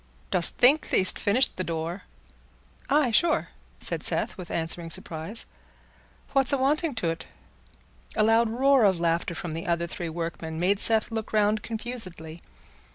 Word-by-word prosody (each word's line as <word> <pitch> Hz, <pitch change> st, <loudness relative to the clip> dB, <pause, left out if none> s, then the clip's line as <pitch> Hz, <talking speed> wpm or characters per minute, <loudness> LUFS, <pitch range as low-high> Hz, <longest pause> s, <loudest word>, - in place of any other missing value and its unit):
Dost 170 Hz, -, +3 dB
think 280 Hz, +5 st, +4 dB
thee'st 185 Hz, -1 st, +2 dB
finished 235 Hz, +6 st, +2 dB
the 185 Hz, -, -1 dB
door?" 170 Hz, +2 st, -4 dB, 0.8 s
"Aye, 280 Hz, -3 st, +3 dB
sure," 315 Hz, +8 st, +2 dB, 0.3 s
said -, -, -1 dB
Seth, -, -, 0 dB
with 180 Hz, -2 st, -9 dB
answering 165 Hz, +1 st, -4 dB
surprise; 165 Hz, +6 st, -6 dB, 0.9 s
"what's 270 Hz, -2 st, +4 dB
awanting 285 Hz, +2 st, +1 dB
to't?" 165 Hz, -6 st, -2 dB, 0.9 s
A 215 Hz, -, +3 dB
loud 225 Hz, +1 st, +4 dB
roar 265 Hz, +2 st, +4 dB
of 190 Hz, -4 st, +3 dB
laughter 170 Hz, +1 st, 0 dB
from 170 Hz, 0 st, -5 dB
the 165 Hz, +2 st, -5 dB
other 170 Hz, 0 st, 0 dB
three 170 Hz, 0 st, -5 dB
workmen 165 Hz, -1 st, -5 dB
made 190 Hz, +4 st, +1 dB
Seth 220 Hz, 0 st, +2 dB
look 220 Hz, -1 st, -4 dB
round 210 Hz, 0 st, +2 dB
confusedly. 200 Hz, -9 st, -6 dB
200 Hz, 145 wpm, -26 LUFS, 170-235 Hz, 0.9 s, think